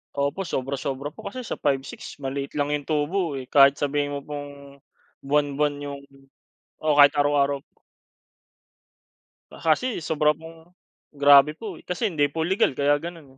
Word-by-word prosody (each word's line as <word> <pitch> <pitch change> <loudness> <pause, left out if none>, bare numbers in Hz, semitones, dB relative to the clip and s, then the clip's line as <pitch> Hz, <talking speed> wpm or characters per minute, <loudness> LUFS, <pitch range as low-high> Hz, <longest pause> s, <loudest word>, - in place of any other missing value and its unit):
Opo, 140 +7 -1
sobra-sobra 135 +2 -3
po. - - -10
Kasi 255 -1 -6
sa - - -5
5-6 140 -2 -3
maliit 140 +2 -4
lang 145 0 0
yung 145 -1 -2
tubo 155 +1 -1
eh. 130 - -5
Kahit 140 -1 +6
sabihin 145 0 -1
mo 140 - -3
pong 140 -1 -9 0.5
buwan-buwan 145 0 +1
yung 140 -1 -6 0.8
oo, 155 -1 +1
kahit 145 0 +8
araw-araw. 145 -1 +2 1.9
Ah, - - -13
kasi 170 +5 +1
sobra 150 -1 +2
pong 165 +2 -15 0.4
grabe 145 +1 +6
po 200 -3 -8
eh - - -19
kasi 190 +3 -1
hindi 145 -3 +2
po 160 +3 -3
legal 180 -6 +1
kaya 145 +1 +2
ganoon 165 -4 -9
145 Hz, 150 wpm, -24 LUFS, 140-160 Hz, 1.9 s, kahit